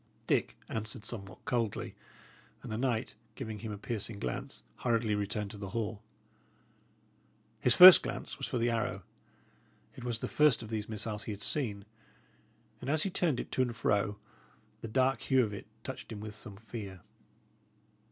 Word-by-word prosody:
Dick -, -, +1 dB
answered 110 Hz, 0 st, -5 dB
somewhat 100 Hz, -5 st, -7 dB
coldly, 115 Hz, -4 st, -1 dB, 0.7 s
and -, -, -7 dB
the 110 Hz, -, -2 dB
knight, 125 Hz, -2 st, 0 dB, 0.2 s
giving 110 Hz, -5 st, -5 dB
him 110 Hz, 0 st, -5 dB
a 105 Hz, -, -5 dB
piercing 110 Hz, 0 st, -4 dB
glance, 125 Hz, +6 st, -5 dB
hurriedly 115 Hz, -3 st, +1 dB
returned 105 Hz, 0 st, -2 dB
to 105 Hz, -, -9 dB
the 100 Hz, -2 st, -5 dB
hall. 110 Hz, 0 st, -3 dB, 1.6 s
His 125 Hz, -, +3 dB
first 185 Hz, 0 st, +12 dB
glance -, -, -5 dB
was -, -, -1 dB
for -, -, -2 dB
the 120 Hz, 0 st, +2 dB
arrow. 115 Hz, -1 st, -1 dB, 0.9 s
It -, -, -9 dB
was 120 Hz, -2 st, -1 dB
the -, -, -4 dB
first 150 Hz, -6 st, +4 dB
of 110 Hz, -, -8 dB
these 110 Hz, -1 st, -3 dB
missiles 105 Hz, 0 st, -3 dB
he -, -, -3 dB
had 100 Hz, -1 st, -5 dB
seen, 105 Hz, -9 st, 0 dB, 1.0 s
and -, -, -4 dB
as 155 Hz, +1 st, +2 dB
he 195 Hz, -, -1 dB
turned 165 Hz, -8 st, +1 dB
it -, -, -5 dB
to -, -, +1 dB
and 120 Hz, -2 st, 0 dB
fro, 105 Hz, -2 st, +1 dB, 0.6 s
the 115 Hz, -, -5 dB
dark 130 Hz, +4 st, +2 dB
hue 130 Hz, -2 st, +3 dB
of 105 Hz, -2 st, -3 dB
it 100 Hz, -, -7 dB, 0.2 s
touched 130 Hz, -, -7 dB
him 110 Hz, -, -5 dB
with 105 Hz, 0 st, -6 dB
some 105 Hz, -1 st, -10 dB
fear. 100 Hz, -3 st, -8 dB
110 Hz, 170 wpm, -32 LUFS, 105-125 Hz, 1.6 s, first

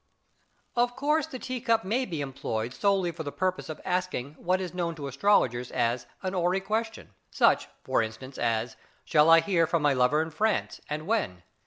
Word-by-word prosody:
Of 245 Hz, 0 st, +2 dB
course 300 Hz, +2 st, +1 dB
the 270 Hz, -, -7 dB
tea 255 Hz, -1 st, -5 dB
cup 225 Hz, -1 st, +2 dB
may 240 Hz, +7 st, 0 dB
be 165 Hz, -8 st, -4 dB
employed 120 Hz, -4 st, -3 dB
solely 195 Hz, -2 st, +1 dB
for 165 Hz, 0 st, -7 dB
the 145 Hz, -2 st, -4 dB
purpose 185 Hz, 0 st, -2 dB
of 155 Hz, -, -6 dB
asking 180 Hz, -7 st, -2 dB
what 185 Hz, +2 st, +1 dB
is 185 Hz, -2 st, -5 dB
known 170 Hz, -2 st, -2 dB
to 150 Hz, -3 st, -6 dB
astrologers 135 Hz, -, +2 dB
as 120 Hz, +1 st, -1 dB, 0.2 s
'a 185 Hz, -, -1 dB
horary 180 Hz, 0 st, +1 dB
question', 220 Hz, -, -3 dB, 0.2 s
such, -, -, +3 dB, 0.2 s
for -, -, +2 dB
instance, 115 Hz, +4 st, -6 dB
as 115 Hz, -1 st, -1 dB, 0.3 s
'Shall 150 Hz, +1 st, +4 dB
I 165 Hz, 0 st, +8 dB
hear 170 Hz, -4 st, +2 dB
from 165 Hz, -2 st, 0 dB
my 145 Hz, -1 st, +4 dB
lover 130 Hz, +3 st, +3 dB
in 160 Hz, -, -7 dB
France, 215 Hz, +7 st, 0 dB
and 150 Hz, +1 st, -3 dB
when?' 180 Hz, -, -1 dB
170 Hz, 190 wpm, -28 LUFS, 135-200 Hz, 0.3 s, I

